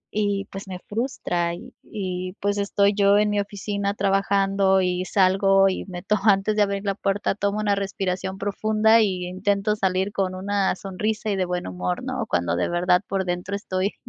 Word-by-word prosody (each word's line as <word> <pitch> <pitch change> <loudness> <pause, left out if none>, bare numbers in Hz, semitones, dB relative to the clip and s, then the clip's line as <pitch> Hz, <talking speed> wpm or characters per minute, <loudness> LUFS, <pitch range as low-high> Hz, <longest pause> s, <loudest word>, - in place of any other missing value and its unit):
Y 205 -1 0
pues 195 0 -7
me 185 - -5
frustra 175 -7 -2
y 245 +7 -12
y 185 -3 -4
pues 205 0 0
estoy 200 0 +2
yo 200 0 +4
en 210 0 +2
mi 205 - +1
oficina 200 0 -3
trabajando 195 -1 +2
y 180 0 -1
salgo 195 0 +4
y 185 - -3
meto, 195 +3 -2
antes 205 0 +3
de 210 - +2
abrir 200 0 -2
la 200 - +1
puerta, 195 0 0
tomo 200 0 -1
una 205 -1 +1
respiración 190 -1 -3
profunda 215 +2 +3
y 185 -4 0
intento 200 +3 0
salir 190 0 0
con 185 -1 -1
una 195 0 0
sonrisa 210 +3 -3
y - - 0
de 185 - +1
buen 180 0 -3
humor, 90 0 -3
¿no? - - -3
Cuando 85 -1 0
de - - 0
verdad 180 +1 +2
por 195 -1 -1
dentro 180 +3 -3
estoy 190 0 -2
195 Hz, 185 wpm, -24 LUFS, 185-205 Hz, -, yo